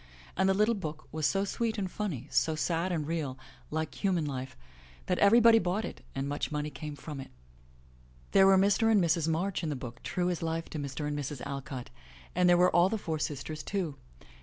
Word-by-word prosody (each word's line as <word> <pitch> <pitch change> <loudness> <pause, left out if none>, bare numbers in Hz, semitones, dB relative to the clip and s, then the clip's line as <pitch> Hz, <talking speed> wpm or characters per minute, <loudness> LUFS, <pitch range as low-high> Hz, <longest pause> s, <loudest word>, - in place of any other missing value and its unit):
And 190 +1 +3
the 190 - +3
little 210 +3 +3
book 155 -7 -6
was 155 -2 +1
so 195 0 +1
sweet 225 +2 -1
and 190 -3 -2
funny, 185 - -3
so 160 - +2
sad 170 +3 0
and 160 -4 -1
real, 150 -5 -2 0.3
like 160 +5 -4
human 180 -5 +2
life, 130 - -5 0.5
that 180 - 0
every 205 +4 +7
body 230 -1 +7
bought 185 +4 -1
it - - -8
and 135 +1 -2
much 145 +2 -2
money 150 0 -2
came 150 +2 -6
from 145 0 -7
it. 135 - -8 1.0
There 195 0 +6
were 195 0 +7
Mr. 205 +3 +4
and 215 - +5
Mrs. 165 -2 +2
March 175 +4 0
in 165 - -2
the 145 - -2
book, 125 -2 -8
true 180 0 -1
as 175 - -3
life 165 0 -3
to 155 - -4
Mr. 145 +1 -4
and 145 - -2
Mrs. 145 -2 -4
Alcott, 135 -2 -6 0.4
and 180 0 +3
there 175 - +6
were 180 -1 +4
all 175 +2 +6
the 220 - -1
four 160 -6 -3
sisters 150 +1 -4
too. 180 -8 -2
165 Hz, 215 wpm, -30 LUFS, 150-190 Hz, 1.0 s, every